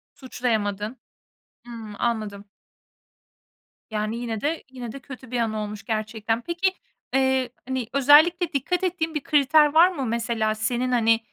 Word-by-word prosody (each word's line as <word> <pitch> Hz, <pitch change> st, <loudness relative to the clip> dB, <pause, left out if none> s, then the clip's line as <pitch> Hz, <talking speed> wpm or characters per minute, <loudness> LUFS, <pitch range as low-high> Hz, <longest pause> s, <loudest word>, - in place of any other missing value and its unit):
Suçlayamadın. 220 Hz, -3 st, -2 dB, 0.7 s
Hımm, 225 Hz, -3 st, -8 dB
anladım. 215 Hz, -4 st, -2 dB, 1.5 s
Yani 215 Hz, +1 st, -2 dB
yine 230 Hz, -3 st, -4 dB
de, 315 Hz, +3 st, -1 dB
yine 245 Hz, -3 st, -7 dB
de 275 Hz, -, -8 dB
kötü 260 Hz, -2 st, -11 dB
bir 245 Hz, -, -1 dB
anı 220 Hz, -2 st, -1 dB
olmuş 210 Hz, 0 st, -6 dB
gerçekten. 220 Hz, +1 st, -2 dB
Peki, 345 Hz, +6 st, 0 dB, 0.4 s
eee, 265 Hz, -1 st, +2 dB, 0.2 s
hani, 260 Hz, -3 st, -2 dB
özellikle 310 Hz, +5 st, +5 dB
dikkat 355 Hz, +7 st, -1 dB
ettiğin 325 Hz, -3 st, -1 dB
bir 295 Hz, -, -2 dB
kriter 295 Hz, +1 st, +4 dB
var 340 Hz, +3 st, +7 dB
mı 275 Hz, -7 st, -3 dB
mesela 225 Hz, -1 st, -1 dB
senin, 245 Hz, +3 st, -1 dB
hani, 225 Hz, -2 st, +3 dB
245 Hz, 140 wpm, -24 LUFS, 220-285 Hz, 1.5 s, var